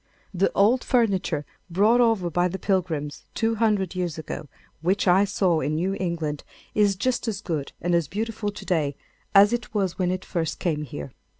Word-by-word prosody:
The 190 +1 +2
old 225 +6 +4
furniture 200 - +1 0.2
brought 210 +8 +4
over 220 -7 +2
by 175 +2 +2
the 185 +2 -4
Pilgrims, 165 -8 -1
two 225 0 +1
hundred 205 -5 +2
years 180 -4 -2
ago, 155 -1 -6 0.3
which 190 +4 +1
I 185 +3 +5
saw 185 -4 +1
in 150 +1 -1
New 185 +5 0
England, 165 -5 -2 0.3
is 205 -2 +3
just 245 +5 -1
as 210 -3 -2
good 160 -8 -3
and 175 0 -1
as 170 -4 +2
beautiful 220 +3 -3
to 205 - -8
day 150 -6 0 0.4
as 205 +3 +7
it 235 -2 -3
was 195 -3 0
when 180 -1 +1
it 185 +1 -2
first 165 -3 -2
came 155 -4 -1
here. 75 - -7
185 Hz, 185 wpm, -25 LUFS, 165-205 Hz, 0.4 s, as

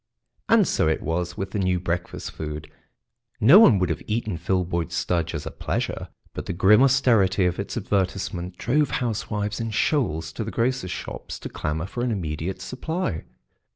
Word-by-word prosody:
And - - +5
so - - +2
it 80 - 0
was 90 +2 -2
with 95 0 -4
the 105 - -2
new 95 -1 +1
breakfast 90 0 -3
food. 75 -1 -6 0.7
No 135 - +8
one 125 - +7
would 90 -1 +1
have 80 - -3
eaten 110 -3 -1
Filboid 85 0 -1
Studge 85 -1 -1
as 75 - -4
a - - -5
pleasure, - - -3 0.3
but - - -6
the - - -2
grim 105 +6 +5
austerity 115 -9 +4
of 90 0 0
its 100 +4 -4
advertisement 95 -3 -2
drove 145 +3 +1
housewives 105 -3 -2
in 115 0 -2
shoals 105 - 0
to 115 - -3
the 110 - -4
grocers' 120 -3 0
shops - - -6
to - - -7
clamour 75 +2 -3
for 120 +5 -4
an 125 - +1
immediate 85 -3 -3
supply. 160 - -3
95 Hz, 175 wpm, -24 LUFS, 85-115 Hz, 0.7 s, No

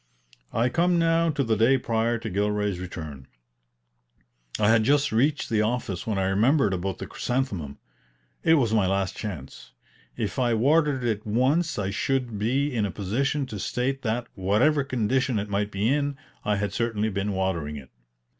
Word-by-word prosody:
I 120 +2 +1
come 175 +4 +2
now 165 0 +3
to 145 -3 0
the 115 -3 +1
day 115 +5 +4
prior 115 -1 0
to 115 0 -6
Gilray's 105 -1 0
return. 80 -7 -7 1.3
I 105 0 +4
had 115 0 +5
just 145 +4 +2
reached 140 +6 +1
the 110 -2 +1
office 110 -4 -2
when 110 -3 0
I 95 - +1
remembered 105 +4 +3
about 95 +1 -3
the - - -6
chrysanthemum. 105 - -3 0.6
It 165 - +5
was 120 -7 +2
my 105 -4 +3
last 95 0 0
chance. 85 - -7 0.4
If - - -2
I 120 -2 +2
watered 145 +2 +2
it 110 -3 -1
once 135 +10 +1
I 100 -2 -1
should 120 0 -1
be 135 +6 0
in 110 - +1
a 105 - 0
position 130 +10 -1
to 110 -5 -7
state 135 +6 -1
that, 120 0 -1
whatever 110 +11 +2
condition 130 -1 0
it 105 0 -3
might 100 +1 0
be 105 +2 0
in, 145 -1 -1 0.3
I 105 - +1
had 100 0 -2
certainly 110 -2 0
been 100 0 -2
watering 90 -6 -1
it. 70 -3 -10
110 Hz, 175 wpm, -26 LUFS, 100-135 Hz, 1.3 s, had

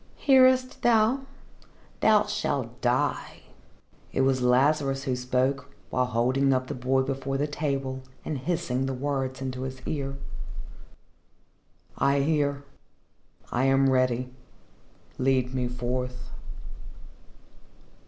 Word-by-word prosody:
"Hearest 260 -2 +4
thou? 240 +4 +3 0.7
Thou 210 -1 +4
shalt 140 - -3
die." 125 +1 0 0.7
It - - 0
was 130 -1 +2
Lazarus 135 +2 +2
who 130 -3 -1
spoke, 130 +2 -1 0.2
while 125 0 +1
holding 130 +3 +2
up 130 0 0
the 145 - -5
boy 130 +1 +1
before 135 0 -2
the 145 - +1
table 135 -3 -3 0.2
and 150 - -3
hissing 135 -4 -1
the 135 - -2
words 135 -1 -2
into 130 -1 -4
his 130 0 -5
ear. 135 -2 -3 1.8
"I 140 0 +3
hear. 145 -1 0 0.9
I 125 +2 +1
am 135 0 +4
ready. 130 -1 +1 0.9
Lead 130 -1 +1
me 125 -1 -1
forth." 125 +1 -4
135 Hz, 110 wpm, -27 LUFS, 130-145 Hz, 1.8 s, Hearest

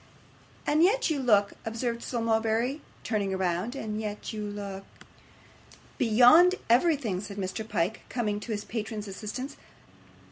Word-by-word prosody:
'And 300 +2 +3
yet 395 +2 +3
you 295 - 0
look,' 210 -6 +3
observed 230 +1 -3
Sir 240 - -3
Mulberry, 230 +4 +1 0.2
turning 200 -4 -1
round; 185 +6 -1
'and 215 -4 -4
yet 210 +1 -5
you 215 -1 -4
look 200 -1 -6 0.6
' - - -24
'Beyond 255 - +7 0.2
everything,' 245 - +2
said 200 -1 -8
Mr. 200 +3 -4
Pyke, 180 +6 -1
coming 210 -4 -1
to 225 - -7
his 210 -1 -3
patron's 215 -2 -4
assistance. 215 +7 -6
220 Hz, 140 wpm, -28 LUFS, 205-245 Hz, 0.6 s, Beyond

